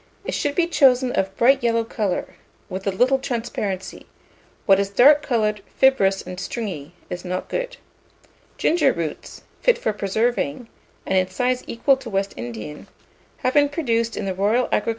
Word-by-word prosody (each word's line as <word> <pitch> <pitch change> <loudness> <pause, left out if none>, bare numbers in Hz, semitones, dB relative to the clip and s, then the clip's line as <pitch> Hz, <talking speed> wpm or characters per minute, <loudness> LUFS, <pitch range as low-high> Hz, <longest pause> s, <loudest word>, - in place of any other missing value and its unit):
It - - -2
should 290 -1 -1
be 350 - +3
chosen 260 -6 +3
of 190 - +1
a - - -21
bright 250 +8 +3
yellow 230 -1 +1
colour, 210 -4 -3 0.4
with 190 +2 -5
a - - +2
little 255 +7 +2
transparency: 225 -7 -4 0.6
what 195 -1 +5
is 200 0 0
dark 285 +8 +6
coloured, 215 -6 0
fibrous, 195 -8 +3
and 180 0 -8
stringy, 180 -9 -5 0.2
is 180 0 -5
not 180 0 -4
good. - - -3 0.8
Ginger 305 -5 +3
roots, 165 -3 -6 0.2
fit - - +4
for 220 - -1
preserving, 220 - -1 0.4
and 190 - +2
in 185 - 0
size 250 +6 -1
equal 265 +4 +2
to 260 -3 -9
West 195 -1 -1
Indian, 120 +5 -7 0.6
have 255 - +2
been 290 -1 +4
produced 230 -7 -1
in - - -3
the 190 - -1
Royal - - -15
Agricultural 200 +1 +3
Garden 245 +3 +1
in - - -1
Edinburgh. 210 - -3
225 Hz, 180 wpm, -22 LUFS, 190-260 Hz, 0.8 s, dark